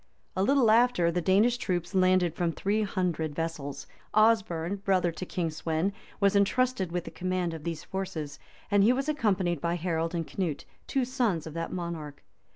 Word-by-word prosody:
A 185 - 0
little 245 +1 +4
after, 225 -7 +4
the 175 +1 -1
Danish 210 +7 +3
troops 175 -3 -2
landed 185 -2 +3
from 170 -1 0
three 205 +5 0
hundred 175 -7 -1
vessels: 160 -4 -4 0.3
Osberne, 200 -5 +3
brother 190 -3 +1
to 180 +2 -7
King 170 -3 -2
Sweyn, 160 +4 -1 0.3
was 200 0 +3
intrusted 200 -1 +2
with 175 0 -2
the - - -8
command 185 -2 -2
of 160 -2 -7
these 165 -2 -4
forces, 165 -6 -5 0.3
and 205 -1 +5
he 230 +4 +5
was 270 +2 -2
accompanied 195 - 0
by 170 0 0
Harold 165 -1 -1
and 165 -1 -1
Canute, 165 -6 -3 0.2
two 270 -2 +1
sons 240 - 0
of 160 - -7
that 165 0 -4
monarch. 165 -5 -5
180 Hz, 175 wpm, -28 LUFS, 165-205 Hz, 0.3 s, and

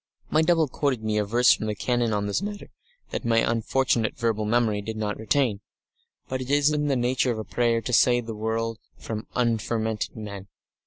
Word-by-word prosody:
My 155 - +4
double 165 -1 +3
quoted 130 -3 -1
me 110 -1 0
a - - +2
verse 120 +4 +4
from 110 - -3
the 105 - -2
Canon 120 +3 0
on 105 -1 0
this 100 - -1
matter 205 0 -6 0.4
that - - -3
my 115 -1 +2
unfortunate 115 0 +1
verbal 115 -2 0
memory 110 -2 +1
did 110 +2 -5
not 105 -1 -3
retain, 110 -2 +1 0.7
but 130 0 -3
it 130 - -6
was 145 +1 +4
in 150 -1 0
the 140 - +2
nature 125 +1 +1
of 115 - -3
a 110 - -3
prayer 115 0 +1
to 125 - -4
save 120 0 +4
the 115 - -5
world 110 +1 -2 0.2
from 110 -1 -6
"unfermented 110 -2 -1
men." 100 -3 -7
115 Hz, 200 wpm, -25 LUFS, 110-125 Hz, 0.7 s, My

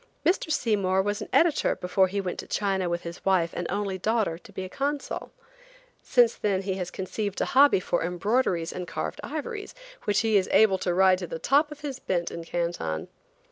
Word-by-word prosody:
Mr. 350 -3 +2
Seymour 195 -8 +1
was 205 +1 -2
an - - -5
editor 330 -2 +3
before 190 +1 +2
he 200 +2 -2
went 185 -2 -3
to - - -6
China 195 -3 0
with 170 0 -2
his 170 0 -8
wife 180 -3 +2
and 175 - -3
only 195 -1 -2
daughter, 210 -5 0
to 200 - -16
be 190 -1 -5
consul. 280 +7 -3 0.7
Since 240 -3 +4
then 195 -2 0
he 190 0 -1
has 180 -2 -4
conceived 200 +2 -4
a - - +1
hobby 280 -5 +5
for 175 - -1
embroideries 180 0 0
and 180 -1 -5
carved - - -4
ivories, 410 +9 -5 0.3
which 205 -1 +2
he 220 -2 +3
is 190 - +1
able 195 -4 +5
to 180 - 0
ride 185 0 +5
to 180 - -5
the - - -5
top 290 - +2
of 300 - -10
his 280 -3 -5
bent 175 -2 -1
in 170 - -6
Canton. 165 - -3
190 Hz, 200 wpm, -27 LUFS, 180-225 Hz, 0.7 s, hobby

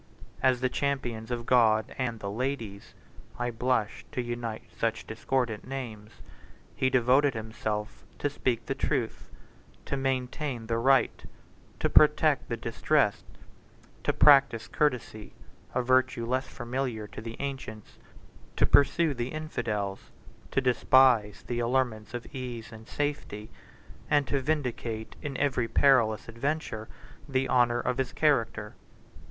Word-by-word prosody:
As 130 -1 +3
the 130 - +3
champion 125 -5 -2
of 120 -1 -3
God 110 -4 +3
and 120 -4 -2
the 100 -1 -4
ladies, 115 -4 -4 0.4
(I 120 0 -1
blush 115 -2 -1
to - - -3
unite 120 -2 -4
such 115 -1 -1
discordant 115 0 -2
names,) 115 -6 -6 0.7
he 130 -1 +2
devoted 130 +2 +3
himself 110 -1 -4
to - - 0
speak 125 -5 -1
the 135 - -1
truth; 135 -4 -2 0.6
to - - -2
maintain 130 -1 -2
the 115 0 -1
right; 135 +2 +3 0.6
to - - +2
protect - - +4
the - - -2
distressed; - - +1 0.8
to - - +2
practise 135 -6 +5
courtesy, 125 -7 -1 0.4
a 125 - +1
virtue 130 -2 +2
less 130 +3 -1
familiar 120 -3 -3
to 105 - -9
the 115 +1 -7
ancients; 130 -6 -6 0.6
to - - +3
pursue 145 +3 +4
the 120 -2 -3
infidels; 110 -11 -3 0.4
to 135 - +1
despise 125 -4 +4
the 120 -1 -2
allurements 120 -3 -1
of 120 - -5
ease 125 -3 -6
and 110 0 -12
safety; 145 -8 -4 0.6
and 145 -1 +3
to 140 0 -1
vindicate 125 -6 -2
in 140 -2 -4
every 130 -5 +1
perilous 115 -5 +3
adventure 115 -2 -3 0.4
the 135 0 +1
honor 120 -1 +3
of 125 +2 -1
his 130 - -1
character. 115 -8 +1
125 Hz, 130 wpm, -28 LUFS, 110-135 Hz, 0.8 s, practise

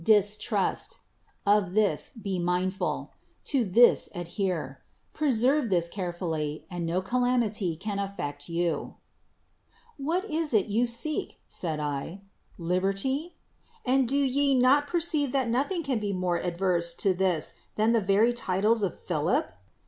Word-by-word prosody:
Distrust. 210 0 +1 0.5
Of 200 -2 +3
this 205 -8 +2
be 200 -5 -4
mindful: 180 +2 -1 0.3
to 270 -4 +1
this 230 +4 +5
adhere: 175 -5 -3 0.3
preserve 270 -2 +2
this 175 -3 +2
carefully, 170 -5 -3
and 175 -2 -3
no 180 +3 0
calamity 230 -6 +1
can 200 +4 -4
affect 145 -8 -5
you." 170 0 -1 0.3
— - - -43
' - - -43
' 465 - -32
What 330 +7 -1
is 315 - -1
it 205 - +4
you 230 +4 +2
seek? 235 +6 -2
' - - -42
' - - -44
said 160 -4 -2
I. 150 +5 -4
' - - -44
' - - -29
Liberty? 195 - -1 0.5
x\nd 260 0 +3
do 275 +4 +1
ye 280 0 +2
not 265 +3 +4
perceive 310 -5 0
that 265 -4 +1
nothing 290 +9 0
can 265 -5 0
be 205 -2 -2
more 180 -2 0
adverse 175 -1 0
to 195 - +2
this 180 -4 0 0.2
than 215 +2 +3
the 230 -1 +3
very 205 +5 +3
titles 215 0 +1
of 195 - -1
Philip? 175 - 0
200 Hz, 155 wpm, -28 LUFS, 175-250 Hz, 0.5 s, this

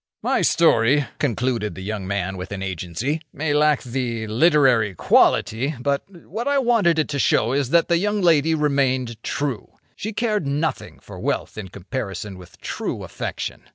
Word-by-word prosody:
"My - - +1
story," 135 +6 +4
concluded 120 -5 -1
the 95 - -7
young 100 -2 -4
man 95 -1 -2
with 95 +1 -7
an 100 -1 -4
Agency, 95 - -3
"may 145 +1 -1
lack 150 -1 +3
the 120 -3 -3
literary 120 - +3
quality; 130 - +3
but 140 +2 0 0.2
what 225 - -4
I 285 0 +2
wanted 230 -10 +3
it 155 - +1
to 140 -1 -2
show 115 -2 +2
is 140 -2 0
that 170 +3 +4
the 170 -1 +2
young 205 +2 0
lady 160 -3 +3
remained 130 -6 0
true. 135 -4 -3 0.2
She 215 - -4
cared 215 -7 -1
nothing 150 +3 -2
for - - -11
wealth - - -2
in 110 -3 -6
comparison 100 -1 -6
with 90 0 -15
true - - -4
affection. - - -6
135 Hz, 165 wpm, -22 LUFS, 110-155 Hz, 0.2 s, story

